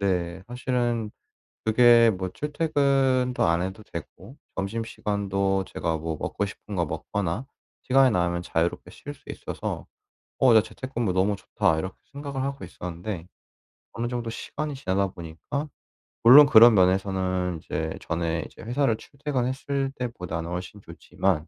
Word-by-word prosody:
네. 90 -3 -1
사실은 120 -3 -1 0.6
그게 115 +1 +6
뭐 95 -2 -3
출퇴근도 135 - +1
안 85 +1 +2
해도 95 +4 -5
되고 95 - -9 0.2
점심시간도 100 -2 -1
제가 80 -1 -2
뭐 80 0 -3
먹고 100 - -2
싶은 100 +1 -8
거 85 -2 +1
먹거나 100 - -3 0.4
시간이 130 0 +5
나면 85 -3 0
자유롭게 85 0 -1
쉴 145 - -9
수 - - -20
있어서 - - -5 0.5
'어 130 -3 +6
나 110 - +7
재택근무 115 -2 -3
너무 100 +2 +2
좋다.' 95 -3 0
이렇게 95 +3 -5 0.2
생각을 140 -2 -4
하고 140 0 -4
있었는데 90 0 -6 0.7
어느 115 +1 -3
정도 120 -2 -3
시간이 150 +5 -5
지나다 100 -6 0
보니까 85 - -6 0.6
물론 135 +6 +10
그런 115 -2 +8
면에서는 95 -2 +1
이제 80 +1 -3
전에 85 0 -1
이제 - - -13
회사를 120 -1 +1
출퇴근했을 135 0 -2
때보다는 90 -9 -4
훨씬 90 +3 -5
좋지만 85 0 -2
105 Hz, 315 characters per minute, -26 LUFS, 90-125 Hz, 0.7 s, 물론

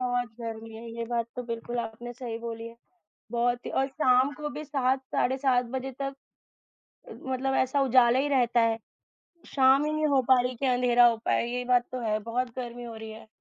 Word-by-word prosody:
बहुत 245 -1 0
गर्मी 225 -1 -6
है, 230 +1 -9
ये 235 - -3
बात 235 -1 -1
तो 250 - -3
बिल्कुल 240 0 -5
आपने 235 +1 -5
सही 240 -2 -6
बोली 230 -1 -6
है। 230 - -14 0.5
बहुत 240 +1 0
ही - - -4
और 270 - +1
शाम 265 -1 +3
को 300 0 -5
भी 300 - -6
7 270 -3 0
साढ़े 260 +1 +2
7 255 -2 +2
बजे 265 +1 -3
तक, 275 0 -2 1.0
मतलब 265 0 -2
ऐसा 265 +2 +2
उजाला 250 -1 +5
ही 280 +2 +1
रहता 245 -4 +3
है। 225 -1 +2 0.7
शाम 270 +1 +4
ही 305 - -1
नहीं 310 0 +1
हो 280 -3 +3
पा 260 -1 +6
रही 250 - 0
है 255 - -9
कि 270 - -2
अँधेरा 245 -1 +5
हो 235 -1 +3
पाए। - - +1
ये 250 +1 -3
बात 245 -1 +3
तो 255 - -3
है। 215 -2 0
बहुत 240 +3 -2
गर्मी 245 -1 -6
हो 230 -1 -7
रही 220 0 -8
है। 220 +1 -11
245 Hz, 215 wpm, -28 LUFS, 235-265 Hz, 1.0 s, पा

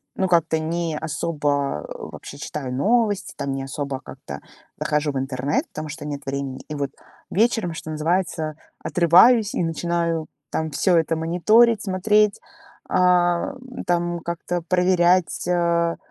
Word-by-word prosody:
ну, 190 - +1
как-то 165 -2 +3
не 165 0 -2
особо 145 - -1
вообще 140 - -9
читаю 135 -3 -5
новости, 210 - +1
там, 140 - -3
не 135 0 -3
особо 135 0 -4
как-то - - -9 0.4
захожу 150 -1 0
в 135 - -1
интернет, 135 +2 -1
потому 155 0 -6
что 155 +1 -7
нет 145 -1 -4
времени. 135 -1 -4
И 150 - -4
вот 140 -1 -2 0.4
вечером, 220 -4 +1
что 160 - -7
называется, 160 0 -1 0.3
отрываюсь 190 +6 +5
и - - 0
начинаю, 165 0 -1 0.2
там, 160 -1 -2
всё 175 +4 +3
это 165 0 +1
мониторить, 205 +8 +4
смотреть, 210 +2 +2 0.5
ам, 180 +8 +1
там, 175 0 0
как-то 170 +1 -3
проверять, 180 -1 +2
а, 170 -1 +1
170 Hz, 135 wpm, -23 LUFS, 150-180 Hz, 0.5 s, отрываюсь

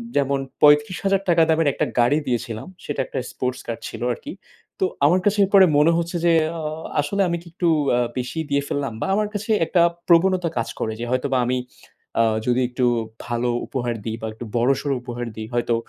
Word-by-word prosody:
যেমন 140 -1 +1 0.2
৩৫,০০০ 160 +7 +4
টাকা 170 -1 +5
দামের 160 -1 +3
একটা - - 0
গাড়ি 120 +5 +4
দিয়েছিলাম। 115 -3 -3 0.2
সেটা 145 - -4
একটা - - -4
sports 125 0 -3
car 115 - -3
ছিল 115 - -8
আর - - -10
কি। - - -5 0.5
তো - - +3 0.2
আমার 175 +6 +4
কাছে 205 0 +2
এরপর 195 +1 +5 0.2
মনে 155 +3 +5
হচ্ছে 170 +1 -2
যে, 170 - +5 0.3
আ - - -4 0.4
আসলে 200 +8 -1
আমি 170 0 -1
কি - - -16
একটু 175 - -1 0.3
আ - - +2 0.2
বেশি 125 +6 -3
দিয়ে 140 0 +2
ফেললাম? 140 -4 -2
বা - - 0
আমার 210 +1 +1
কাছে 215 +2 -3
একটা 170 +1 +2 0.3
প্রবণতা 180 +1 +4
কাজ 115 - -1
করে 110 - -2
যে, - - -3
হয়তোবা 130 +1 0
আমি 125 +1 0 0.6
আ - - +5 0.2
যদি 125 +1 +2
একটু 125 0 0 0.4
ভালো 120 +1 -1 0.2
উপহার 120 -3 -2
দিই 110 -1 -2
বা 110 - -3
একটু 115 +2 -8
বড়সড় 135 +4 +1
উপহার 120 0 -5
দিই 110 0 -6
হয়তো 120 -1 +1
140 Hz, 195 wpm, -22 LUFS, 120-170 Hz, 0.6 s, টাকা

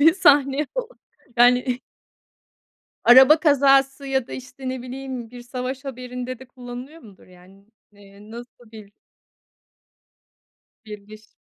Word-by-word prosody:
bir 320 +3 +6
sahneye 285 -5 +3
falan? - - -3 0.5
Yani. 245 +1 +3 1.2
Araba 265 +6 +7
kazası 275 -2 +3
ya 265 -2 -1
da - - -11
işte 260 +1 -8
ne 255 -1 -5
bileyim 255 -2 -7
bir 245 0 -11
savaş 255 +2 -6
haberinde 250 -1 -7
de 260 - -14
kullanılıyor 250 +5 -11
mudur 205 -4 -17
yani? 185 +2 -20 0.3
Eee 205 +1 -17
nasıl 240 0 -13
bir 215 -2 -13 1.9
Bir 210 -1 -8
giriş. 215 +1 -16
250 Hz, 120 wpm, -22 LUFS, 230-270 Hz, 1.9 s, Araba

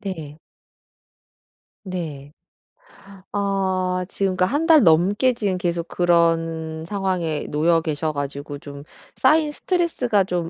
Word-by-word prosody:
네. 160 -6 -7 1.5
네. 155 -6 -6 1.0
아 190 -2 -1
지금 195 -2 -1
그러니까 185 - +2
1 290 - 0
달 315 -4 +7
넘게 195 +10 +4
지금 200 -5 -1
계속 170 -1 -2
그런 165 -2 +1
상황에 185 -6 -2
놓여 165 +2 +2
계셔 155 0 -2
가지고 145 0 -5
좀 140 -1 -10 0.3
쌓인 305 +3 +3
스트레스가 295 - 0
좀 175 -2 -2
175 Hz, 210 characters per minute, -22 LUFS, 160-200 Hz, 1.5 s, 달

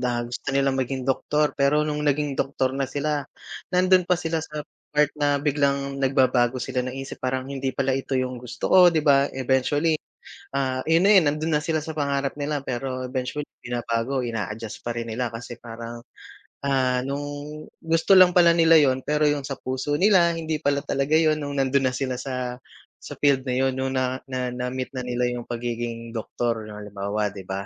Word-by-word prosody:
na 120 -1 0
gusto 120 +3 -6
nilang 135 -1 +2
maging 130 0 -2
doktor 150 +3 +1
pero 145 +2 +3
nung 150 -1 -2
naging 145 -1 0
doktor 135 -1 0
na 135 0 -1
sila 145 +1 -2 0.5
nandun 185 0 +4
pa 180 - +3
sila 165 -2 -2
sa 150 -1 -5 0.3
part 150 -1 +4
na 145 -1 +2
biglang 140 -1 0
nagbabago 130 -2 +2
sila - - -3
naisip 135 +1 -6
parang 130 0 -1
hindi 135 -1 -3
pala 135 -1 0
ito 135 +1 -2
yung 130 -1 -1
gusto 125 -1 -5
ko, 190 - +7
'di 160 -2 +1
ba? 140 -1 +5
Eventually, 135 +4 +1 0.6
ah, 130 -1 0
yun 165 +2 +4
na 205 - +6
yun, 185 -5 +6
nandun 155 +2 -2
na - - -8
sila 160 0 0
sa 160 - -5
pangarap 140 -2 -1
nila 145 0 -1
pero 130 0 -3
eventually 130 +3 -3
binabago 120 +2 -2
ina-adjust 115 -1 -4
pa 120 0 -3
rin 115 0 -4
nila 125 +2 -1
kasi 120 +1 -7
parang, 115 0 -8 0.7
ah, 130 -2 +2
nung 140 +1 -3 0.6
gusto 165 +3 +2
lang 185 -1 +9
pala 170 -2 +6
nila 165 0 +6
yun 130 -4 +3
pero 150 0 +2
yung 145 -1 -1
sa 135 -2 -5
puso 130 +3 -2
nila 185 -3 +5
hindi 160 -1 -3
pala 140 -1 0
talaga 140 +2 -1
yun 155 -1 +2
nung 145 -1 -4
nandun 135 0 +2
na - - -7
sila 130 -2 -2
sa 125 -2 -4 0.4
sa - - -8
field 140 -2 +2
na 125 - 0
yun 130 - +1
nung 130 0 -2
na 130 0 -1
na 125 -1 -2
na-meet 125 +1 -4
na 130 - -3
nila 125 0 0
yung 120 -1 -5
pagiging 115 -1 -4
doktor 115 -1 -3
yung 105 - -8
halimbawa, 105 0 -3
'di 95 -2 -9
ba? 95 +1 -3
135 Hz, 190 wpm, -24 LUFS, 125-145 Hz, 0.7 s, lang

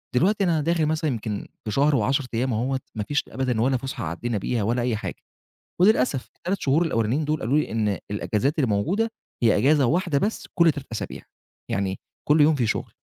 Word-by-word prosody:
دلوقتي 195 +8 +3
أنا 165 -4 +2
داخل 165 +1 +1
مثلًا 155 0 0
يمكن 110 -3 -4 0.2
في 105 - -2
شهر 145 +6 +3
و10 135 +4 +1
أيام 120 +2 0
أهوة 130 +4 0 0.2
ما 105 - -2
فيش 145 +7 0
أبدًا 130 -4 -1
ولا 130 +2 +2
فسحة 130 -5 -5
عدينا 105 +8 -2
بيها، 110 +2 -1
ولا 120 +4 0
أي 120 -2 0
حاجة، 105 - -4 0.7
وللأسف 140 - +3
ال3 185 +2 -3
شهور 145 +4 +2
الأولانيين 120 +2 0
دول 155 +1 -1
قالوا 130 +7 +1
لي 150 - -1
إن 105 -3 0
الإجازات 110 +8 -1
الموجودة، 150 - +1 0.3
هي 115 -2 +4
إجازة 140 +4 +4
واحدة 165 0 +1
بس 210 +7 -2
كل 170 -2 +5
3 140 -1 -8
أسابيع، 110 - -5 0.5
يعني 95 -1 -1 0.3
كل 150 +1 +5
يوم 155 +2 +6
فيه 125 -5 0
شغل. - - -3
135 Hz, 195 wpm, -24 LUFS, 115-155 Hz, 0.7 s, يوم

